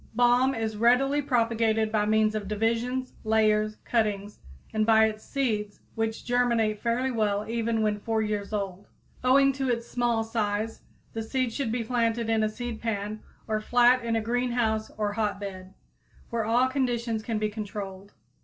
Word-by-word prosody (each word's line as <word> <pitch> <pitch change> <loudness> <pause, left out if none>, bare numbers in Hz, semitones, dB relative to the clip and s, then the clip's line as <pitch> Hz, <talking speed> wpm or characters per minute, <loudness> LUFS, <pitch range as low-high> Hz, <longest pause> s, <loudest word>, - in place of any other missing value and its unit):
_ - - -24
Balm 245 +2 +4
is 220 -1 -3
readily 260 +6 +3
propagated 225 -4 +1
by 210 -1 +1
means 215 0 +3
of 210 -2 -3
divisions, 230 +5 -1
layers, 215 -1 +2
cuttings, 210 -3 -1 0.3
and 215 0 +2
by 220 0 +5
its 215 0 -3
seeds, 215 -7 -2
which 225 -1 -3
germinate 235 -4 +1
fairly 245 +3 0
well 210 -3 0
even 230 -1 0
when 210 -1 0
four 220 +1 0
years 210 -1 -3
old. 200 -2 -4 0.4
Owing 275 +2 +5
to 270 -1 -2
its 235 -1 -1
small 240 -2 0
size, 220 -1 -2 0.3
the 225 - -3
seed 245 +1 -1
should 265 -4 -2
be 235 0 -1
planted 230 -1 0
in 220 -1 +2
a 215 - +2
seedpan 215 -2 -4 0.3
or 215 -1 -1
flat 245 +2 +4
in 230 -1 0
a 225 - +1
greenhouse 235 -2 0
or 210 -1 -1
hotbed, 200 -3 -3 0.6
where 230 -2 -1
all 240 +3 +3
conditions 240 -4 -1
can 225 0 -2
be 215 0 0
controlled. 200 -2 -6
225 Hz, 165 wpm, -27 LUFS, 215-240 Hz, 0.6 s, by